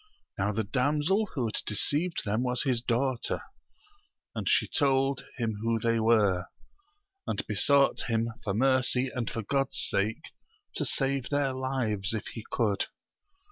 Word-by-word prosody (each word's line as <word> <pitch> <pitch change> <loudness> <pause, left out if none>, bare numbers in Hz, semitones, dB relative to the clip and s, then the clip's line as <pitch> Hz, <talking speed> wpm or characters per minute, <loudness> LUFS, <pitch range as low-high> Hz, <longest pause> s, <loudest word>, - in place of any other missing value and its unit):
Now 100 +1 0
the 110 +2 -1
damsel 150 - +1
who 130 -4 0
had 110 - -1
deceived 150 - +1
them 110 +3 0
was 125 -1 +1
his 125 -5 +1
daughter, 125 +1 -1 0.9
and - - -2
she - - +3
told 135 -2 +1
him 110 -4 -2
who 115 0 +1
they 115 +1 +1
were, 105 -5 +3 0.8
and - - -2
besought 140 -1 +3
him 115 0 +1
for 100 -2 -1
mercy 130 +1 +2
and 125 -4 -2
for 115 - -4
God's 135 +5 0
sake 105 +3 -1 0.5
to - - 0
save 135 -1 0
their 140 -2 +1
lives, 120 -6 -1
if 110 - -4
he 115 - -8
could. 105 -5 0
125 Hz, 145 wpm, -29 LUFS, 110-135 Hz, 0.9 s, she